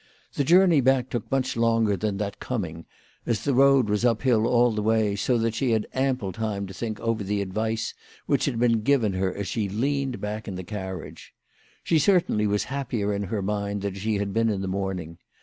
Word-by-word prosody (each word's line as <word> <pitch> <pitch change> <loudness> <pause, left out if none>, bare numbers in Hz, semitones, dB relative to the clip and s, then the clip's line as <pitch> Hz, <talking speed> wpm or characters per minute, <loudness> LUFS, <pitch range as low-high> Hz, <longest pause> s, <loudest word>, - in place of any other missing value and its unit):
The 140 - 0
journey 170 0 +5
back 130 0 +2
took 120 -4 -4
much 135 -1 0
longer 115 -2 +2
than 100 +1 -2
that 100 -1 -4
coming, 85 -10 -4 0.4
as> 115 -3 0
the 140 - +1
road 135 -2 +5
was 105 +1 0
up 115 -2 +2
hill 115 -4 +3
all 120 0 +4
the 105 -1 -2
way, 110 -1 +2
so 120 +5 +1
that 115 -1 0
she 120 0 0
had 110 -1 +1
ample 130 -7 0
time 105 -1 -3
to 95 - -9
think 110 +2 -4
over 115 -2 -1
the 100 +1 -1
advice 110 +3 -2 0.3
which - - +1
had 115 - -1
been 115 -2 +2
given 115 -4 +2
her 95 0 0
as 100 +1 -5
she 105 -4 -2
leaned 135 +4 -1
back 105 +2 -5
in 95 - -4
the 90 - -5
carriage. 95 -2 -7 0.5
She 165 - +2
certainly 155 - +2
was 105 0 +1
happier 115 -5 -2
in 100 0 -2
her 100 +1 -3
mind 100 0 -2
than 100 -1 -2
she 105 +3 -2
had 100 -1 -2
been 115 0 +2
in 100 -3 -1
the 95 - -3
morning. 95 -4 -4
110 Hz, 215 wpm, -25 LUFS, 100-125 Hz, 0.5 s, journey